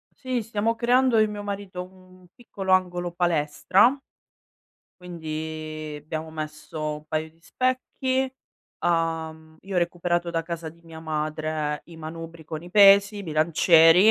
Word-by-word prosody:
Sì, 255 -3 -2
stiamo 225 +1 -1
creando, 245 +1 +3
io 215 - +6
e - - -2
mio 205 -1 -6
marito, 200 -3 -5
u - - -9
u 185 -1 -19
un 180 - -19
piccolo 195 -5 -4
angolo 180 -1 +1
palestra 175 - +2 1.0
quindi 155 -3 -6
abbiamo 160 +1 -5
messo 155 0 -5
un 150 0 -14
paio 155 +1 -2
di 165 +1 -30
specchi, 260 +5 -1 0.5
uhm, 160 -1 -1
io 195 0 -7
ho - - +5
recuperato 175 0 0
da 165 -1 -1
casa 165 -1 -5
di 170 +2 -15
mia 165 -1 -11
madre 155 -1 -2
i 170 - -14
manubri 165 +1 -8
con 155 +1 -6
i 175 - -10
pesi, 200 +1 +7
i 205 - -5
bilancieri, 165 +3 +5
170 Hz, 155 wpm, -25 LUFS, 160-195 Hz, 1.0 s, pesi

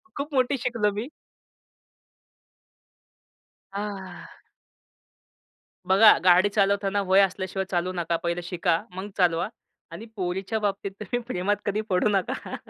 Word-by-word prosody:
खूप 290 +2 -5
मोठी 260 +1 +2
शिकलो 235 -4 0
मी. 215 +5 -4 2.7
आह. 195 -3 -7 1.4
बघा 200 +3 +7
गाडी 185 +2 +5
चालवताना 200 -1 +1
वय 190 +1 +6
असल्याशिवाय 190 0 -1
चालवु 180 0 0
नका. 170 -1 -1
पहिलं 170 +1 -1
शिका, 170 -1 0
मग 190 +3 -6
चालवा 175 -2 +2 0.4
आणि 170 +7 -8
पोरीच्या 190 +3 -2
बाबतीत 200 -1 -2
तुम्ही 215 +4 -2
प्रेमात 205 -3 0
कधी 205 +1 0
पडू 185 +2 +2
नका. 195 -3 -2
195 Hz, 115 wpm, -25 LUFS, 180-210 Hz, 2.7 s, बघा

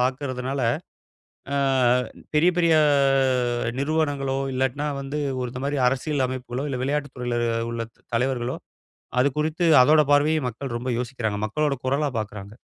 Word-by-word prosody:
பாக்குறதுனால, 130 +1 -2 0.9
அ - - +1 0.8
பெரிய, 165 +4 +5
பெரிய 170 -2 +4 1.1
நிறுவனங்களோ, 140 -2 0 0.2
இல்லாட்டின்னா 130 +3 -1
வந்து 140 +2 -4 0.2
ஒரு 125 - -2
இந்த 125 - -5
மாதிரி 145 0 -1
அரசியல் 135 +1 0
அமைப்புகளோ, 130 +1 -4
இல்ல 130 -2 -3
விளையாட்டுத் 140 0 -2
துறையில 120 -1 -2 0.4
உள்ள 115 0 -3 0.3
தலைவர்களோ 125 0 -1 0.6
அது 135 - +4
குறித்து 155 +3 0 0.2
அதோட 155 +4 +5
பார்வையை 150 +2 +4
மக்கள் 125 +1 -6
ரொம்ப 125 +2 -5
யோசிக்கிறாங்க. 120 -4 -3
மக்களோட 145 +6 0
குரலா 140 +3 +1
பாக்குறாங்க. 105 -2 -6
135 Hz, 130 wpm, -24 LUFS, 125-145 Hz, 1.1 s, பெரிய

